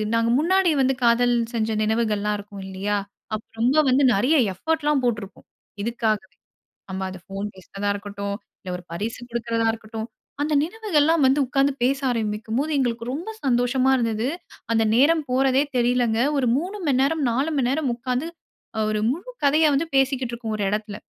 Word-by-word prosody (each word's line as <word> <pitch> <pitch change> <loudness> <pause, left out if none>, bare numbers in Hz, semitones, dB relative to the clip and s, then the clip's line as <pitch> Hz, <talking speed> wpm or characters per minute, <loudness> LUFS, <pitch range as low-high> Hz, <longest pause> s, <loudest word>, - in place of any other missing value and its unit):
நாங்க 230 0 +2
முன்னாடி 370 +1 +3
வந்து 265 0 +3
காதல் 240 +1 +4 0.2
செஞ்ச 220 -1 0
நினைவுகள்லாம் 215 -2 0
இருக்கும் 200 -1 -9
இல்லயா! 195 +2 -2 0.4
அப்ப 215 - -6 0.2
ரொம்ப 255 +6 +3
வந்து 270 +2 +4
நிறைய 255 +11 +3 0.2
எஃபோர்ட் 320 - -2
லாம் 295 -2 +3
போட்டிருக்கோம். 215 -5 -3 0.3
இதுக்காகவே! 215 -3 -1 0.5
நம்ம 190 0 -4
அத 185 - -8
ஃபோன் 195 +1 -4
பேசுறதா 200 +2 -5
இருக்கட்டும், 200 0 -5 0.3
இல்ல 185 - -8
ஒரு 180 - -12
பரிசு 210 +7 -4
கொடுக்கிறதா 230 -1 -1
இருக்கட்டும். 220 0 -6 0.3
அந்த 300 +1 0
நினைவுகள் 375 -1 -1
எல்லாம் 320 0 +3
வந்து 265 +2 +4
உட்கார்ந்து 275 +2 +2
பேச 270 +3 +2
ஆரம்பிக்கும் 220 -1 -2
போது, 305 +3 -1
எங்களுக்கு 235 -3 -1
ரொம்ப 335 +9 -5 0.2
சந்தோஷமா 255 +1 +2
இருந்தது. 230 -1 0 0.4
அந்த 225 0 +3
நேரம் 310 +6 +4
போறதே 265 +1 +3
தெரியலங்க. 240 -2 +2 0.2
ஒரு 260 -3 +1
3:00 365 +7 -3
மணி 260 -3 +3
நேரம், 305 +2 +1
4:00 270 +7 0
மணி 255 -3 +2
நேரம் 280 0 0
உட்கார்ந்து 250 +4 -2 0.5
அ - - 0
ஒரு 215 0 0
முழு 360 - -6
கதைய 305 +3 +4
வந்து 295 +4 +1
பேசிக்கிட்டு 270 -2 +2
இருக்கோம், 225 -2 -5
ஒரு 205 - -1
இடத்தில. 210 0 -3
240 Hz, 170 wpm, -23 LUFS, 215-275 Hz, 0.5 s, காதல்